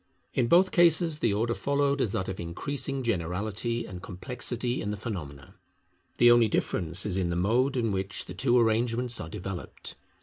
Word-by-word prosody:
In 120 - +1
both 180 +7 +5
cases 170 -2 +4
the 115 - +2
order 115 +4 0
followed 140 +1 +1
is 110 - +1
that 95 - -2
of 95 - -5
increasing 135 - -3
generality 105 +3 -2
and 90 -1 -8
complexity 120 +5 -3
in 105 - -3
the 105 - -3
phenomena. 75 - -7 0.6
The 120 0 +7
only 120 -1 +6
difference 85 -3 -1
is 95 -3 -2
in 90 -2 0
the 85 - -1
mode 120 +9 +2
in 115 -3 +1
which 95 0 -2
the - - -8
two 120 +5 +2
arrangements 115 +1 +2
are 80 - -6
developed. 90 +2 -6
115 Hz, 175 wpm, -28 LUFS, 95-125 Hz, 0.6 s, The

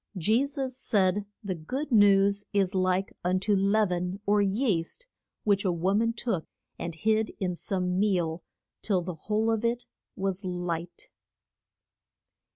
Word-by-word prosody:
Je 215 +9 +3
sus 270 -2 -3
said 205 -5 +1 0.2
the 195 -2 -2
good 260 - -4
news 200 -2 +5
is 195 -1 +2
like 185 +1 +1
un 180 +1 +2
to 205 +2 +2
leav 200 +1 +2
en 180 +2 -2
or 205 0 +3
yeast, 200 - 0 0.4
which 200 -2 +2
a 190 - +2
wo 175 +3 0
man 230 +3 +2
took 230 -7 -2 0.3
and 170 -1 -4
hid 220 +4 +1
in 180 -2 -1
some 180 0 -1
meal 175 -5 +1 0.4
till 190 -4 +1
the 180 +1 -4
whole 215 +7 0
of 225 0 -1
it 235 +1 0 0.3
was 195 0 -2
light. 175 -2 -4
195 Hz, 150 wpm, -28 LUFS, 180-215 Hz, 0.4 s, news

